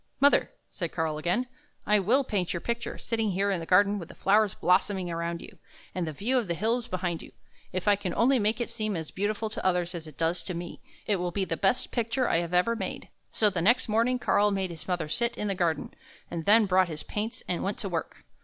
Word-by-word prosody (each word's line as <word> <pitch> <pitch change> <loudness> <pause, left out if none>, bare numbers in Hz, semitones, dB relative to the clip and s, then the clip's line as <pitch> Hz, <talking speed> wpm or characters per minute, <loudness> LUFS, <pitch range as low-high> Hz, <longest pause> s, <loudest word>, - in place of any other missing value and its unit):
" - - -45
Mother," 285 +1 +5 0.2
said 170 -4 -4
Karl 160 -2 -1
again, 180 +11 0 0.2
" - - -41
I - - +5
will 240 +9 +3
paint 195 -8 -1
your 170 - -2
picture, 235 +5 -3
sitting 225 -3 -1
here 200 +2 +1
in 190 - 0
the 165 - -7
garden, 200 +2 +4
with 170 - -8
the - - -12
flowers 205 0 +3
blossoming 185 0 +1
about 170 0 -3
you, - - -12 0.3
and 175 -2 -2
the - - -2
view 235 - +1
of 230 - -3
the 170 - -1
hills 230 +5 0
behind 180 -2 -2
you. - - -12 0.4
If 185 +2 -3
I 205 - +6
can 195 -2 -4
only 255 +2 +4
make 215 +2 +1
it 240 - -2
seem 215 -3 -2
as 160 -1 -6
beautiful 210 +3 -1
to - - -5
others 180 -1 +1
as 165 -2 -6
it 150 - -13
does 165 +2 0
to 180 - -3
me, 175 0 -7 0.2
it 205 - +1
will 180 0 -1
be 190 +2 -1
the - - -2
best 200 +5 +1
picture 235 +1 0
I - - +2
have 170 0 -2
ever 180 +6 +3
made." - - -5 0.2
So 210 -2 +2
the 180 -3 -1
next 240 +8 +3
morning 230 +4 +2
Karl 210 -4 +3
made 190 -3 -1
his 160 -2 -9
mother 175 -4 -1
sit 235 +9 0
in 210 - -2
the 200 - +1
garden, 170 -5 -1 0.4
and 165 -2 -4
then 215 +1 +6
brought 185 -1 +3
his 155 -2 -6
paints 225 +4 -4
and 175 - -1
went 200 +2 -2
to 200 - -4
work. 165 -3 -4
195 Hz, 250 wpm, -28 LUFS, 175-220 Hz, 0.4 s, I